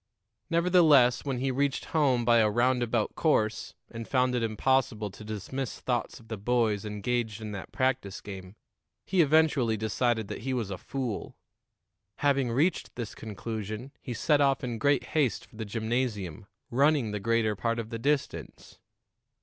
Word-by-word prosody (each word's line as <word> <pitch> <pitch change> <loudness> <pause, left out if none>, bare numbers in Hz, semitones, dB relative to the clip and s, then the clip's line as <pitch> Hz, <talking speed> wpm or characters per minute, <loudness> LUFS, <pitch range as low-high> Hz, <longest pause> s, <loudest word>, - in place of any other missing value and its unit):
Nevertheless, 165 -8 +5
when 135 -3 -1
he 135 +2 0
reached 140 +1 0
home 135 -7 +3
by 120 0 +5
a 110 -1 +4
roundabout 120 0 +1
course, 115 -8 0 0.2
and 115 -1 -7
found 125 -1 +2
it 125 - 0
impossible 115 -2 0
to 110 - -12
dismiss 110 +5 -5
thoughts 120 -3 -2
of 115 - -18
the 110 -1 -5
boys 110 -2 +1
engaged 110 +1 -2
in 110 -1 -6
that 100 -2 -7
practice 130 -7 -1
game, 95 -1 -9 0.5
he 190 -2 +3
eventually 150 -7 +3
decided 110 +1 0
that - - -6
he 130 +2 -2
was 110 -5 -2
a 95 - -3
fool. 125 -6 -4 0.8
Having 140 -4 +1
reached 155 +9 0
this 120 -4 -5
conclusion, 110 +3 -6
he 120 - -5
set 145 +5 +2
off 135 -1 +2
in 120 -3 -3
great 145 0 +3
haste 140 -9 +1
for - - -21
the 110 - -4
gymnasium, 110 -5 -2 0.2
running 140 -2 +3
the 105 - -3
greater 115 0 +1
part 115 +3 -1
of 115 0 -5
the 115 - -4
distance. 145 +3 -3
120 Hz, 160 wpm, -28 LUFS, 110-135 Hz, 0.8 s, Nevertheless